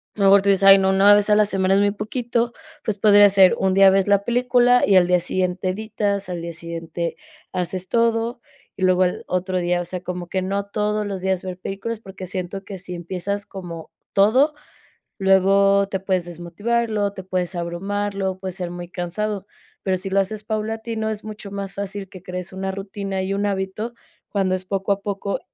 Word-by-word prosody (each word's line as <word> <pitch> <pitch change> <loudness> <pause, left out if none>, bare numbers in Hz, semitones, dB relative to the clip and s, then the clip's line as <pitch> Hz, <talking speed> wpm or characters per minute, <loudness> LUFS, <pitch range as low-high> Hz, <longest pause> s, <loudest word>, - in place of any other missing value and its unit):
a - - -13
lo - - +4
mejor 195 0 +6
tú 200 - +2
dices: 195 0 +3
"Ay, 195 0 +9
no, 190 0 +2
una 200 +2 +7
vez 205 0 +2
a 210 - +6
la 215 - +5
semana 190 -1 +1
es - - +4
muy 205 0 +3
poquito", 235 +3 -2 0.3
pues, 210 -2 -2
podría 205 -1 +7
ser 190 -2 +6
un 190 -1 +2
día 195 0 +7
ves 195 0 +2
la 200 0 +3
película 245 0 +3
y 200 - +4
al 180 - +5
día 180 0 +3
siguiente 185 +1 -1
editas, 200 -1 -2
al 175 -1 -3
día 170 0 -5
siguiente 170 0 -5 0.4
haces 185 0 -3
todo 230 +1 +1 0.4
y 190 - -4
luego 185 0 +4
el 180 - -2
otro 185 +1 -1
día, 175 0 0
o 175 - -5
sea, 180 +1 -6
como 180 -1 -5
que 190 - -1
no 200 +1 -2
todos 210 +1 -1
los 195 -2 -4
días 190 -1 0
ver 185 -1 -5
películas, 210 +4 -5
porque 190 -3 -9
siento 185 +2 -5
que 195 - -7
si 180 0 -8
empiezas 190 +4 -4
como 170 -4 -8 0.2
todo, 255 +10 +4 0.7
luego 195 +1 +4
te 190 -1 -2
puedes 190 -2 -1
desmotivar, 190 +8 -2
luego 205 -2 0
te 190 - -8
puedes 180 -1 -2
abrumar, 195 +4 -3
luego 190 -1 -2
puedes 190 -2 -5
ser 180 -3 -4
muy 175 0 -7
cansado, 195 +3 -3 0.4
pero 190 -1 +1
si 190 +1 -6
lo 195 - +3
haces 210 +2 -2
paulatino, 220 +1 -3
es 215 -1 -5
mucho 210 -2 -8
más 200 -1 -5
fácil 200 -1 -5
que 185 - -11
crees 180 0 -6
una 190 0 -3
rutina 195 0 -4
y 195 - -2
un 200 +1 -1
hábito, 195 +4 -3 0.4
cuando 195 -2 0
es 185 0 -6
poco 195 +1 -2
a 200 - -7
poco, 200 0 -3
195 Hz, 210 wpm, -22 LUFS, 185-205 Hz, 0.7 s, Ay